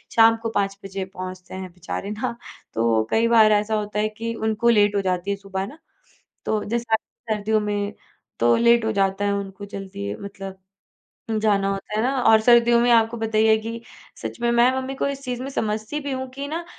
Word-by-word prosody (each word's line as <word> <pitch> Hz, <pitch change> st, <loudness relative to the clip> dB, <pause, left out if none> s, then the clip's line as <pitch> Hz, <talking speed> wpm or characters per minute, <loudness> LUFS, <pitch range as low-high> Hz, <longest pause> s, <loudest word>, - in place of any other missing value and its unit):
शाम 225 Hz, 0 st, +6 dB
को 225 Hz, -, -1 dB
5 195 Hz, 0 st, 0 dB
बजे 195 Hz, 0 st, -4 dB
पहुँचते 185 Hz, -1 st, -8 dB
हैं 190 Hz, -1 st, -6 dB
बेचारे 180 Hz, +3 st, -5 dB
ना, 215 Hz, +2 st, -3 dB, 0.4 s
तो 115 Hz, -1 st, +2 dB
कई 225 Hz, +1 st, +3 dB
बार 225 Hz, -2 st, +6 dB
ऐसा 210 Hz, +1 st, +2 dB
होता 210 Hz, 0 st, -2 dB
है 215 Hz, -, +1 dB
कि 230 Hz, 0 st, -3 dB
उनको 220 Hz, +1 st, +1 dB
लेट 205 Hz, -2 st, +4 dB
हो 200 Hz, -, +2 dB
जाती 185 Hz, 0 st, -1 dB
है 200 Hz, -, -1 dB
सुबह 195 Hz, -1 st, -4 dB
ना, 280 Hz, +8 st, -12 dB, 0.7 s
तो 215 Hz, -1 st, 0 dB
जैसे 235 Hz, +1 st, -3 dB
आ -, -, +7 dB, 0.3 s
सर्दियों 215 Hz, 0 st, +1 dB
में 205 Hz, -1 st, -2 dB, 0.5 s
तो 120 Hz, 0 st, +5 dB
लेट 235 Hz, 0 st, +4 dB
हो 220 Hz, -, +1 dB
जाता 195 Hz, 0 st, +1 dB
है 200 Hz, -, +1 dB
उनको 200 Hz, 0 st, -4 dB
जल्दी 190 Hz, -, -6 dB
मतलब, 195 Hz, -1 st, -8 dB, 0.8 s
जाना 200 Hz, -2 st, +2 dB
होता 195 Hz, +1 st, -4 dB
है 215 Hz, -, +1 dB
ना। 250 Hz, -, +2 dB
और 220 Hz, -2 st, +6 dB
सर्दियों 235 Hz, +1 st, +5 dB
में 240 Hz, +1 st, +3 dB
आपको 230 Hz, 0 st, +4 dB
पता 220 Hz, -1 st, -1 dB
ही 220 Hz, -, +5 dB
है 220 Hz, 0 st, +6 dB
कि 230 Hz, +1 st, -6 dB, 0.4 s
सच -, -, -6 dB
में 235 Hz, 0 st, +2 dB
मैं 235 Hz, +1 st, +5 dB
मम्मी 265 Hz, +1 st, -3 dB
को 270 Hz, -, -1 dB
इस 275 Hz, -1 st, -5 dB
चीज़ 250 Hz, 0 st, -3 dB
में 270 Hz, -, -4 dB
समझती 215 Hz, +3 st, -2 dB
भी 280 Hz, -1 st, -4 dB
हूँ 260 Hz, 0 st, -3 dB
कि 275 Hz, +2 st, -6 dB
ना 330 Hz, +3 st, -4 dB
215 Hz, 215 wpm, -23 LUFS, 195-235 Hz, 0.8 s, आ